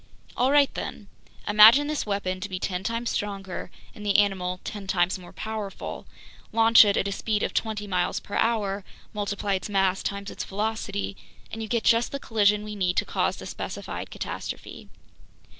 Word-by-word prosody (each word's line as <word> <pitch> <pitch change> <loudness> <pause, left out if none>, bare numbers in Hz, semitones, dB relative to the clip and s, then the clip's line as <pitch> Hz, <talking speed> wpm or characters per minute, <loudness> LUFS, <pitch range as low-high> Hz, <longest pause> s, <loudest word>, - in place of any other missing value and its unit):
"All 255 +2 +2
right 285 -1 +4
then! 200 - -6 0.4
Imagine 220 +7 +8
this 300 -5 -2
weapon 190 -2 -1
to 205 +2 -5
be 185 - -3
ten 180 0 -2
times 230 +2 -2
stronger 195 -3 -4 0.2
and 210 - -10
the 205 -1 +3
animal 185 -3 +1
ten 200 -2 -6
times 185 0 +1
more 175 -1 -12
powerful, 215 -3 -6 0.4
launch 225 +1 +7
it 200 -1 +2
at 195 - +1
a - - -2
speed 210 +1 -1
of - - -1
twenty 215 -2 -1
miles 180 -3 0
per 200 - -13
hour, 205 -4 +1 0.3
multiply 205 -1 -2
its 190 +2 -2
mass 195 -2 +2
times 200 0 -4
its - - -5
velocity, 195 - -3 0.4
and 225 - -5
you 220 - -4
get 235 0 0
just 230 +1 +3
the 280 - -3
collision 210 -4 +2
we 210 0 -6
need 180 -3 0
to - - +2
cause - - 0
the - - -9
specified - - -6
catastrophe. - - -6
205 Hz, 180 wpm, -26 LUFS, 195-220 Hz, 0.4 s, Imagine